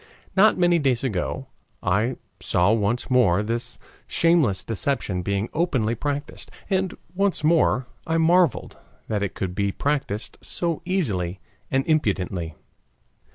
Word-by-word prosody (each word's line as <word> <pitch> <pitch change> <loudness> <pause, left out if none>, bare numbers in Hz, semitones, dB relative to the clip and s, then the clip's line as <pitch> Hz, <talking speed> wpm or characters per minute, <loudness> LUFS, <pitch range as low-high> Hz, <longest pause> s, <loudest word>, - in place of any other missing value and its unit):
Not 210 +3 +5
many 175 -1 +4
days 135 -5 +1
ago 130 +3 -2 0.4
I 105 +7 +1 0.2
saw 90 +4 +2
once 115 +4 0
more 105 -7 +4
this 120 +1 -3 0.3
shameless 160 - +3
deception 110 -4 -1
being 100 +3 -1
openly 130 -10 +1
practiced, 145 +4 -4 0.2
and 190 -1 0 0.2
once 195 -3 0
more 155 -6 +3 0.2
I 165 0 +1
marveled 170 -2 +3 0.3
that 105 -2 0
it 100 - -2
could 95 -2 -3
be 100 +1 0
practiced 135 -5 -2
so 170 -3 -2
easily 100 - -1 0.3
and 135 0 +1
impudently. 95 - 0
125 Hz, 125 wpm, -24 LUFS, 100-165 Hz, 0.4 s, Not